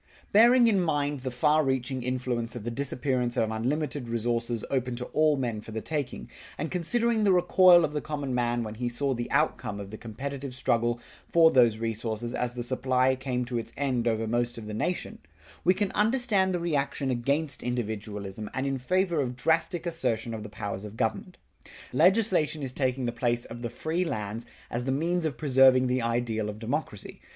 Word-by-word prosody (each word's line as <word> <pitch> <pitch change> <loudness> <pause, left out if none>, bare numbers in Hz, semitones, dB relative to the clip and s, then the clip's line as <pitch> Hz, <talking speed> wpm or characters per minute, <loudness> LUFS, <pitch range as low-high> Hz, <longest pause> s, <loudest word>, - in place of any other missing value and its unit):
Bearing 240 +4 +6
in 200 -4 +3
mind 145 -4 0
the 130 0 -4
far 150 +5 +3
reaching 130 -1 -1
influence 125 -2 -2
of 120 - -6
the 120 - -3
disappearance 125 -1 -1
of 110 -1 +1
unlimited 130 +3 -2
resources 115 0 -1
open 125 -2 0
to 125 +1 -5
all 155 -1 +3
men 120 -5 -2
for 110 - -11
the 110 - -2
taking, 145 +2 -4 0.3
and 155 - -3
considering 225 +6 +1
the 200 - +4
recoil 180 -1 +6
of 150 - -5
the 150 - -1
common 145 -4 -4
man 120 -1 0
when 105 -1 -5
he 120 +2 -2
saw 135 +3 -1
the 120 -1 -4
outcome 140 -8 0
of 100 -1 -8
the 110 - -8
competitive 135 +3 -6
struggle 120 -2 +1 0.3
for 165 -1 +6
these 120 -4 +4
resources 115 +1 -3
as 125 0 -2
the 120 - -3
supply 130 +1 +1
came 125 -1 -2
to 120 -1 -2
its 115 - -7
end 130 -4 0
over 115 -1 +1
most 120 +1 -1
of 115 - -7
the 105 - -6
nation, 175 +11 -2 0.4
we 185 - +4
can 195 0 -1
understand 215 -4 +2
the 180 - -1
reaction 145 -4 -1
against 140 +4 -1
individualism 105 -4 -4
and 130 - -1
in 135 -1 -1
favor 175 +3 +1
of 125 -2 -3
drastic 165 +6 0
assertion 120 -9 -1
of 110 - -5
the 105 - -7
powers 105 -2 -5
of 105 +1 -9
government. 180 - -2 0.6
Legislation 165 - +3
is 130 -2 -3
taking 130 -1 0
the 120 - 0
place 120 0 -1
of 120 +1 -9
the 120 - -3
free 160 +9 -2
lands 110 - -4 0.2
as 120 +1 -2
the 130 - 0
means 165 +5 0
of 145 -6 -2
preserving 130 -2 +5
the 125 0 +1
ideal 115 -2 -1
of 105 - -6
democracy. 115 -2 -4
130 Hz, 195 wpm, -28 LUFS, 115-155 Hz, 0.6 s, Bearing